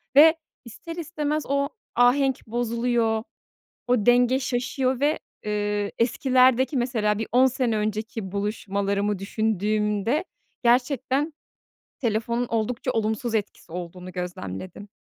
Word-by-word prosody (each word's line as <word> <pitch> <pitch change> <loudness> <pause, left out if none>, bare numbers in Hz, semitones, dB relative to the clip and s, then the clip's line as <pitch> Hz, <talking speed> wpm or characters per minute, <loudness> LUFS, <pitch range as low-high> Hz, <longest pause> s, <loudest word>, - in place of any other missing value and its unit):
ve 315 +3 +8 0.3
ister 330 +8 -9
istemez 305 -2 -2
o 280 +1 +1 0.3
ahenk 255 +1 +3
bozuluyor, 235 -1 0 0.6
o 245 -4 +2
denge 245 +1 +5
şaşıyor 255 +1 -1
ve, 295 +2 +2 0.3
ııı, 205 -1 -1
eskilerdeki, 255 +2 +3
mesela, 225 -4 +1
bir 225 - -3
10 255 +2 +6
sene 250 -3 0
önceki 215 -1 -3
buluşmalarımı 200 0 -1
düşündüğümde, 210 - 0 0.4
gerçekten 260 +4 +2 0.7
telefonun 235 +1 0
oldukça 230 +3 -1
olumsuz 225 +2 -1
etkisi 205 -5 -3
olduğunu 180 +1 -7
gözlemledim. 180 - -6
235 Hz, 105 wpm, -25 LUFS, 210-260 Hz, 0.7 s, ve